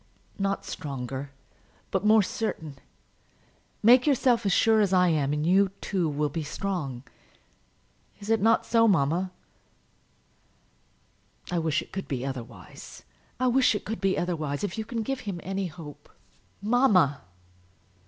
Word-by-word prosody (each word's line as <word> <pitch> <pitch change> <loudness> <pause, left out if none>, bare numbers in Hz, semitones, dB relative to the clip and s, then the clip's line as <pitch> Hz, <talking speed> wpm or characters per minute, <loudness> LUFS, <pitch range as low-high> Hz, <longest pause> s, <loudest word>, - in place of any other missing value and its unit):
"Not 195 0 -1
stronger, 135 -1 -5 0.6
but 190 - 0
more 215 0 +5
certain. 160 -9 -4 1.0
Make 245 +5 +6
yourself 250 -6 +2
as - - +2
sure 220 +3 +4
as 200 -3 +1
I 180 -1 +4
am, 145 -4 +1
and 150 +1 -1
you, 190 +3 +4
too, 180 -5 -1
will 150 +1 0
be 160 +3 -4
strong. 150 -6 -4 1.2
Is 205 +2 -4
it 225 -2 +2
not 225 +2 +3
so, 230 -1 +4
mamma?" 175 0 +1 2.2
"I 175 - +1
wish 160 -2 0
it - - -20
could 195 - -5
be 130 -3 -3
otherwise; 120 -7 -9 0.4
I 255 - +1
wish 250 -2 +3
it - - -4
could 220 +1 -5
be 195 -1 +1
otherwise! 155 -4 -2
If 195 -3 -2
you 220 -1 -4
can 230 0 -3
give 270 +4 -3
him 200 -7 -5
any 195 0 -2
hope 150 -3 -11 0.3
" - - -38
"Mamma!" 205 - +3
185 Hz, 145 wpm, -27 LUFS, 150-215 Hz, 2.2 s, Make